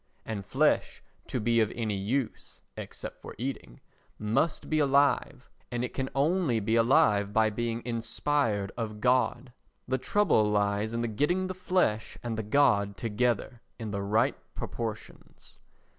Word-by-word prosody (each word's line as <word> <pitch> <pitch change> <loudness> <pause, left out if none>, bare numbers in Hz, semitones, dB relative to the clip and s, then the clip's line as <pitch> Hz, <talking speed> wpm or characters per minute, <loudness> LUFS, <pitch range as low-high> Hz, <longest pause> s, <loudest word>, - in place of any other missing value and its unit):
And 105 -3 -4
flesh - - +1 0.2
to 125 - -2
be 115 +1 +2
of 110 -2 +2
any 110 -3 -1
use 115 +6 -3
(except - - -7
for - - -9
eating) 120 - -5 0.4
must 115 +10 0
be 155 - +1
alive, 140 -2 +2 0.2
and 120 0 -1
it - - -8
can 135 -1 -2
only 145 -3 +2
be 110 +2 0
alive 115 -4 +4
by 110 +1 +3
being 115 +1 -2
inspired 115 -2 0
of 110 -3 -4
God. 125 +1 +1 0.3
The 130 +1 0
trouble 125 - +3
lies 105 +1 +1
in 115 0 -2
the 120 - 0
getting 150 - 0
the 185 - -3
flesh 180 -12 0
and 120 -2 -2
the 110 - -2
God 105 -4 +2
together 120 +1 -1 0.2
in 110 -3 -5
the 100 -1 -2
right 110 +7 +2 0.2
proportions. 110 -2 -7
115 Hz, 150 wpm, -29 LUFS, 105-135 Hz, 0.4 s, alive